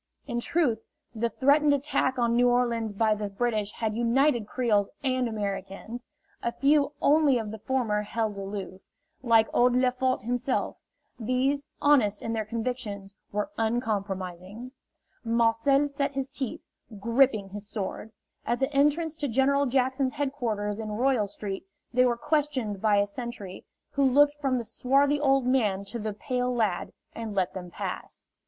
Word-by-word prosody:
In 240 -4 -2
truth, 255 -6 +1 0.3
the 235 +1 -1
threatened 285 +5 +4
attack 265 -2 0
on 235 -1 +2
New 245 +1 +4
Orleans 235 -3 +1
by 215 +1 +2
the 210 -1 -3
British 210 0 -1
had 220 -2 -2
united 240 0 +2
Creoles 215 -6 +1
and 255 -2 +1
Americans. 205 +2 -5 0.4
A 235 - -1
few 285 +3 +2
only 290 -3 +5
of 220 -3 -4
the 220 - -7
former 225 -3 0
held 215 0 -2
aloof 195 -1 -6 0.4
like 225 -3 +4
old 245 0 +4
Lefort 255 -1 +1
himself; 245 +2 -1 0.4
these, 255 +5 0 0.2
honest 240 -9 +3
in 225 - -2
their 220 -1 -1
convictions, 220 -3 -4 0.2
were 210 +8 -2
uncompromising. 205 -2 -3 0.5
Marcel 230 +5 +3
set 280 -1 -2
his 270 -1 -1
teeth, 270 -3 -4 0.4
gripping 230 -2 +2
his 205 +1 -7
sword. 215 +1 -5 0.3
At 240 - -1
the 270 +2 -1
entrance 295 +3 +2
to 290 - -2
General 275 +3 +2
Jackson's 260 +1 +1
headquarters 230 -8 -2
in 215 -1 -4
Royal 245 -2 +2
Street 195 -1 -6 0.3
they 250 +1 +5
were 240 -1 +1
questioned 280 -8 -1
by 215 -2 +3
a 200 - +4
sentry, 205 -3 -7 0.3
who 280 - +1
looked 285 +2 +5
from 265 -3 +1
the 240 - -2
swarthy 275 +5 +2
old 270 -3 +3
man 215 -7 +1
to 235 +4 -5
the 215 -1 -3
pale 250 +4 -2
lad, 215 -7 0 0.2
and 225 -3 -6
let 185 -2 0
them 180 -1 -7
pass. - - -6
240 Hz, 155 wpm, -27 LUFS, 210-265 Hz, 0.5 s, only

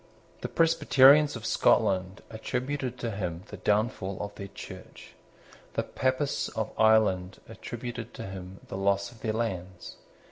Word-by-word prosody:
The - - -2
Presbyterians 150 -3 +5
of 115 -1 -7
Scotland 95 -2 +2
attributed 125 +3 -3
to 120 -2 -3
him 90 -4 -4
the 105 - -8
downfall 105 -1 0
of 100 0 -5
their 100 - -7
Church. - - -11 0.6
The - - 0
Papists 130 +2 -1
of 110 -1 -3
Ireland 105 -4 +3
attributed 120 +1 -7
to 115 - -6
him 95 0 -8
the - - -5
loss 100 +2 +1
of 115 -2 -17
their 110 - -1
lands. 95 -5 -4
110 Hz, 140 wpm, -28 LUFS, 95-120 Hz, 0.6 s, Presbyterians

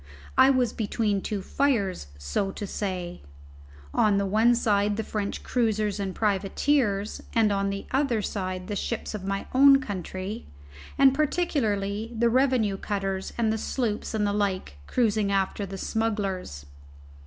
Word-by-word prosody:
I 265 - +7
was 255 -4 +2
between 210 -2 0
two 205 -2 -3
fires, 205 - 0
so 70 - -1
to 205 - -5
say; 185 -3 -4 0.7
on 205 -2 +3
the 200 - +1
one 220 +5 +4
side 205 -3 +1
the 220 - -1
French 205 -1 -4
cruisers 215 -4 0
and 195 -2 -3
privateers, 205 +1 0
and 220 -2 +4
on 200 0 0
the 195 0 -4
other 265 -4 +1
side 185 -2 -3
the 205 - -4
ships 230 +3 -3
of 210 -3 -5
my 195 0 -2
own 275 +1 +7
country, 195 -1 -5 0.5
and 270 -1 +6
particularly 230 - -1
the 235 +1 +3
revenue 250 -6 +2
cutters 195 -1 -3
and 225 -2 +2
the 220 - -2
sloops 225 -2 -2
and 210 -1 +1
the 205 - 0
like 190 - -1
cruising 215 -4 +1
after 195 +1 0
the 195 +1 -6
smugglers. 195 - -2
210 Hz, 150 wpm, -26 LUFS, 195-230 Hz, 0.7 s, I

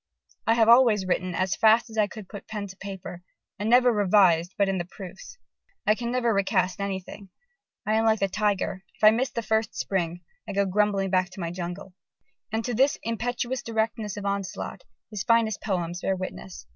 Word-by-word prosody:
"I 225 - +4
have 225 -1 +4
always 230 -5 +6
written 185 -1 -1
as 185 +1 0
fast 225 +2 +4
as - - -9
I 215 -2 +3
could 205 -1 -10
put 205 - -10
pen 210 -2 -4
to 190 -1 -10
paper, 190 -3 -8 0.4
and 210 +2 -1
never 245 +1 +6
revised 185 -4 +3
but 200 - +3
in 190 -1 0
the 175 - -3
proofs.... 190 - -11 0.5
I 215 - +5
can 235 +1 -4
never 240 -2 +1
recast 190 -2 +1
anything. 195 0 -5 0.6
I 215 - +1
am 220 +1 +2
like 220 -1 +3
the 195 - +2
tiger; 195 -2 -1
if - - -21
I 215 - +9
miss 245 +4 0
the 235 - -4
first 220 0 0
spring, 175 -2 -2 0.3
I - - -3
go 200 0 +2
grumbling 195 0 +1
back 185 -1 +2
to 195 - -12
my 170 -2 -3
jungle." 180 +2 -6 0.6
And 220 +1 -2
to 245 - -2
this 265 +5 +3
impetuous 245 +3 -2
directness 220 -3 -2
of 205 - -5
onslaught, 200 -1 -3 0.3
his 210 -2 -4
finest 230 -2 +2
poems 175 -3 -2
bear 190 - 0
witness. 185 0 -7
205 Hz, 195 wpm, -26 LUFS, 190-225 Hz, 0.6 s, I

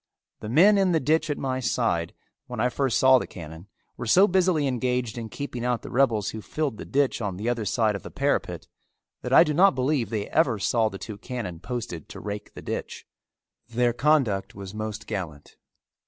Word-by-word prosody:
The 105 - -6
men 195 - +6
in 190 -2 +3
the 160 - +3
ditch 155 +2 +1
at 145 - -1
my 130 -1 -2
side, 115 -9 -1 0.3
when 125 -3 -6
I 125 +3 +2
first 130 0 0
saw 130 0 +6
the - - -5
cannon, 80 +2 -10 0.3
were 120 - -5
so 190 - +6
busily 180 -5 +2
engaged 125 -2 -1
in 115 -2 -6
keeping 125 -3 -5
out 125 -1 -1
the - - -8
rebels 115 -6 +2
who 110 - -7
filled 145 -1 -3
the - - -7
ditch 140 -3 0
on 100 -4 -3
the 105 +4 -4
other 120 -3 -1
side 110 +1 +1
of 100 - -5
the - - -9
parapet, - - -1 0.5
that - - -5
I - - +8
do 150 - -1
not 185 +1 +5
believe 130 -3 0
they 105 -2 -3
ever 140 -8 +2
saw 110 +2 +1
the 95 - -8
two 105 0 -8
cannon 110 -8 -5
posted 110 - -6
to - - -9
rake 105 0 -7
the - - -9
ditch. - - -5 0.6
Their 120 +1 +1
conduct 120 -7 +1
was 100 0 -8
most 110 0 -5
gallant. 85 -9 -6
120 Hz, 205 wpm, -25 LUFS, 105-140 Hz, 0.6 s, I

